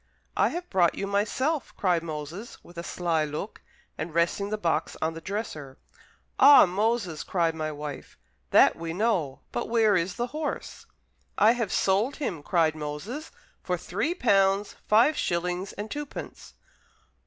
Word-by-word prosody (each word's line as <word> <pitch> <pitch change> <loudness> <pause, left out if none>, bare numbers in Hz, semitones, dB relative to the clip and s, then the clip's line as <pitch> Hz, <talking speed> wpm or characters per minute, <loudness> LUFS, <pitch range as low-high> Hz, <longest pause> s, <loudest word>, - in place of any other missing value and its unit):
"I - - +4
have 350 +1 -5
brought 175 -3 +3
you 195 - -3
myself," 235 +9 -1
cried 180 -4 +2
Moses, 160 +7 -7
with 175 - -16
a - - -5
sly 170 -3 0
look, 155 +8 -5 0.4
and 160 +1 -5
resting 170 +4 +1
the 215 - -1
box 165 -5 -1
on 160 +1 -1
the 165 - -8
dresser. 155 -10 -5 0.6
"Ah, 285 - +9
Moses," 200 -3 -1
cried 170 -3 0
my 155 -1 -3
wife, 145 -1 -7 0.3
"that - - +6
we 165 0 -5
know, 180 - 0
but 120 - -3
where 225 -3 +4
is 180 +1 0
the 240 - -1
horse?" 305 -1 -5 0.5
"I 215 - +6
have 235 -4 -1
sold 205 +8 +2
him," 195 - -3
cried 165 -1 +2
Moses, 155 - -6 0.3
"for 180 -1 -1
three 210 - -2
pounds, 195 - +2
five 235 +8 +5
shillings, 180 +2 -1
and 210 +2 -7
twopence." 295 -1 -7
190 Hz, 155 wpm, -27 LUFS, 165-220 Hz, 0.6 s, Ah